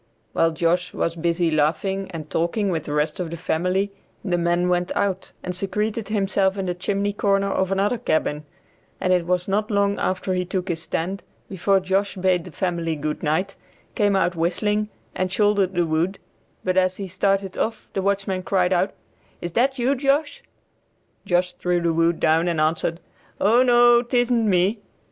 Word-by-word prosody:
While 165 - +3
Josh 175 +2 0
was 165 - -1
busy 170 0 +1
laughing 190 +6 0
and 160 -4 -7
talking 170 +6 0
with 160 -4 -2
the 145 - -4
rest 150 +4 0
of 175 -3 -2
the 170 - -6
family 180 +4 0 0.3
the 180 -3 +1
man 175 +1 +1
went 180 0 0
out, 190 -2 -1
and 180 -1 -4
secreted 210 +3 -2
himself 195 -2 +1
in 195 - -2
the 180 - -1
chimney 200 +3 -1
corner 200 -1 +1
of 190 0 0
another 205 +5 +1
cabin, 150 -3 0 0.6
and 185 - +2
it 175 -2 +1
was 180 0 0
not 205 +2 0
long 200 -1 +1
after 185 0 -1
he 180 0 0
took 185 +1 -3
his 165 -2 -2
stand 185 +5 -3 0.3
before 195 +1 +2
Josh 190 +2 0
bade 185 -2 +1
the - - -9
family 170 -3 -2
good 150 0 -3
night, 175 +6 0 0.4
came 205 -2 +2
out 180 -2 +1
whistling, 210 +5 0 0.2
and 185 0 -2
shouldered 200 -2 +2
the 175 -1 +2
wood, 165 +5 0 0.5
but 185 0 0
as 185 0 +2
he 195 - -5
started 195 +1 0
off 225 +1 -2
the 195 - -1
watchman 195 -1 0
cried 185 -1 +1
out, 185 +2 +1 0.5
"Is 175 - -5
that 265 +7 +1
you, 250 +2 +2
Josh?" 285 +2 0 0.9
Josh 180 0 +1
threw 180 -1 0
the 170 -1 +1
wood 165 +1 +2
down 165 +2 +3
and 170 -2 0
answered, 160 +1 0 0.4
"O 225 +5 +4
no, 240 -1 +6
tisn't 245 -1 +1
me." 190 +4 +2
185 Hz, 180 wpm, -23 LUFS, 170-200 Hz, 0.9 s, no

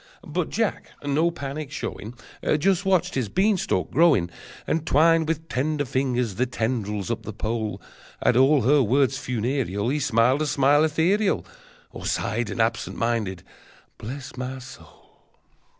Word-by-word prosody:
But - - -2
Jack, - - -1 0.2
no 150 +4 +2
panic 145 -2 -5
showing, 110 +4 -6 0.4
Just 190 +4 +1
watched 180 -1 +2
his 125 -6 -1
beanstalk 195 - +1
growing, 145 - +4 0.3
And 160 - 0
twined 160 +1 +4
with 160 0 -2
tender 145 +2 -1
fingers 125 -3 0
the 125 +6 0
tendrils 110 -4 -2
up 115 -1 -2
the 110 - -7
pole. 110 +1 -3 0.4
At 125 - +2
all 135 +1 +5
her 140 +4 +5
words 130 +1 +2
funereal 120 -3 -1
He 150 +3 0
smiled 125 +2 +2
a 155 - 0
smile 145 +2 +4
ethereal, 175 +7 +1 0.5
Or - - -6
sighed 110 +2 -1
an - - -5
absent 115 0 0
minded 110 -6 -1 0.6
"Bless 130 +5 -7
my 130 +1 -4
soul!" 130 0 -15
130 Hz, 145 wpm, -24 LUFS, 115-155 Hz, 0.6 s, all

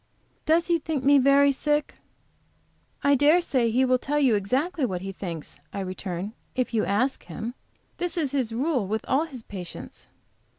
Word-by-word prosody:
"Does 330 +2 +4
he 340 -1 +2
think 295 -3 -3
me 285 +1 +6
very 280 +1 +5
sick?" 295 +2 0 1.1
"I 285 - +5
dare 290 +5 +5
say 255 -9 +1
he 255 +4 +3
will 255 0 +3
tell 290 +4 -1
you 270 -5 +4
exactly 265 - 0
what 185 -8 -1
he 195 - -4
thinks," 170 -7 -6
I 200 - -4
returned, 185 +1 -4 0.2
"if 255 -1 -1
you 220 - +2
ask 250 +7 0
him. 230 +2 -5 0.4
This 355 0 -2
is 295 -6 0
his 260 -5 0
rule 255 - 0
with 220 +2 -2
all 275 +5 +2
his 260 -8 -10
patients." 180 -5 -9
260 Hz, 175 wpm, -26 LUFS, 215-290 Hz, 1.1 s, me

